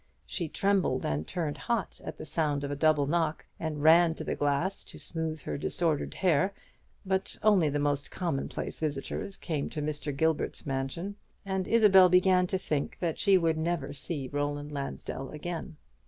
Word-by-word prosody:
She 170 -4 -3
trembled 190 -10 +1
and 75 +1 -1
turned 165 -5 -2
hot 230 -6 -2
at - - -6
the - - -7
sound 150 -3 0
of 140 - -3
a - - -1
double 150 -1 +3
knock, 160 +1 0
and 155 -2 -3
ran 165 +1 +6
to - - -6
the - - -2
glass 145 +7 0
to - - -7
smooth 160 -2 -3
her 75 -2 -3
disordered 150 - 0
hair: 185 +2 +2 0.5
but 190 0 -1
only 200 -8 +5
the 145 - -1
most 145 -1 0
commonplace 165 -7 -3
visitors 155 +5 -3
came 155 -5 -3
to 155 - -5
Mr. 150 0 -2
Gilbert's 160 0 0
mansion; 140 +9 -3 0.3
and 190 -1 -1
Isabel 195 -5 +7
began 180 0 +4
to 190 - 0
think 150 -6 -2
that 170 -3 -2
she 195 -1 +5
would 165 -2 +1
never 160 -4 -1
see 140 -1 -4
Roland 145 +1 -2
Lansdell 140 -1 -5
again. 160 0 -6
160 Hz, 170 wpm, -29 LUFS, 145-180 Hz, 0.5 s, Isabel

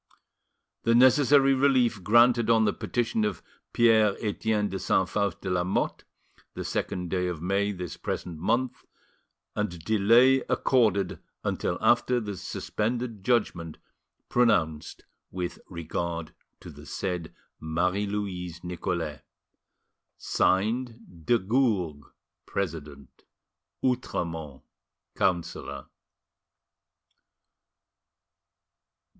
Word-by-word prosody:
The 115 - +3
necessary 135 +2 +6
relief 130 -7 +2
granted 120 +2 +5
on 115 -1 +5
the 105 - +2
petition 115 -2 -1
of 105 - -2 0.3
Pierre 110 -3 +4
Etienne 105 -1 0
de 95 -1 -4
Saint 95 0 +1
Faust 100 -3 -1
de 95 - -3
Lamotte, 90 +1 -1 0.5
the - - -4
second 90 -2 -3
day 90 -1 0
of 90 -3 -3
May 100 +4 0
this 90 -4 -6
present 85 -3 -5
month, 125 +8 0 0.7
and 90 -6 -3
delay 115 +6 +5
accorded 110 -7 +2 0.2
until 90 - -1
after 120 +2 +3
the 105 -3 -5
suspended 115 +3 -3
judgment 95 -8 0 0.5
pronounced 85 -11 +1 0.3
with 90 -1 -4
regard 85 -1 -4 0.3
to - - -10
the - - -13
said 90 -4 -3 0.3
Marie 90 +6 0
Louise 90 -5 -4
Nicolais. 85 -3 -3 1.0
"(Signed) 110 -3 -1
De 120 - +5
Gourgues, 100 - 0 0.4
President. 75 -7 -5 0.6
"OUTREMONT, 80 - -2 0.5
Councillor." 90 -4 -2
100 Hz, 95 wpm, -27 LUFS, 90-115 Hz, 1.0 s, necessary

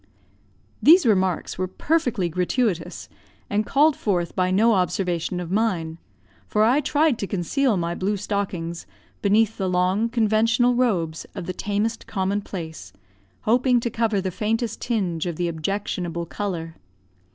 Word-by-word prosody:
These 335 +2 +7
remarks 190 -6 +1
were 185 - 0
perfectly 245 - 0
gratuitous, 180 0 -1 0.4
and 210 +1 0
called 295 +2 +4
forth 175 -5 -1
by 185 -1 +1
no 220 +5 +4
observation 180 -1 0
of 175 -1 -6
mine; 180 -7 0 0.5
for 210 - +2
I 250 +7 +4
tried 295 -2 +2
to 200 - -2
conceal 210 - 0
my 170 -1 -1
blue 200 +4 -1
stockings 185 -4 -3 0.3
beneath 215 +2 +2
the 190 -1 0
long 185 +5 +1
conventional 230 +1 +2
robes 185 -11 0
of 190 -4 -5
the 185 - -4
tamest 210 +4 -2
common 195 +1 -1
place, 160 - -8 0.5
hoping 245 +2 +3
to 235 - -2
cover 225 -2 0
the 190 -1 -2
faintest 225 +3 -2
tinge 185 -8 -1
of 170 - -3
the 175 +2 -1
objectionable 170 0 -3
colour. 165 -4 -5
200 Hz, 140 wpm, -23 LUFS, 175-225 Hz, 0.5 s, These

